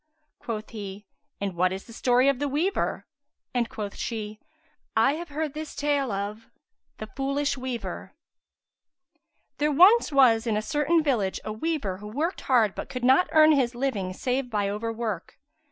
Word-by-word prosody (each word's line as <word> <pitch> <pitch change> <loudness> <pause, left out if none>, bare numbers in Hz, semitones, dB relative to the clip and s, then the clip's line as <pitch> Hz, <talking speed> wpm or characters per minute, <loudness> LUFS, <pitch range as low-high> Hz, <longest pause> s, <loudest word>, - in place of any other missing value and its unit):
Quoth 215 -3 -5
he, 205 -2 -7 0.3
"And 200 -2 -2
what 180 +1 +2
is 190 +1 -5
the 230 - -13
story 250 +2 +3
of 275 -2 +2
the 290 - 0
weaver?"; 320 +8 -1 0.5
and 240 -2 0
quoth 205 -2 -6
she:—I 235 +3 -3
have 340 +2 -6
heard 300 0 -3
this 310 0 -7
take 290 -1 +1
of 210 -2 -4 0.5
The 215 - -6
Foolish 275 +5 -1
Weaver 255 -3 -6 1.4
There 300 +1 +2
was 375 +10 +6
once 240 -5 +5
in 215 -2 +1
a - - 0
certain 300 +5 +2
village 225 -10 0
a 215 - -3
weaver 220 - -2
who 210 +2 -9
worked 300 - -2
hard 230 -6 +3
but - - -6
could 250 -2 -5
not 265 +8 +4
earn 310 0 +7
his 255 -5 +2
living 235 -8 -1
save 250 +5 -2
by 205 -3 0
overwork. 220 -3 -4
250 Hz, 160 wpm, -26 LUFS, 215-290 Hz, 1.4 s, earn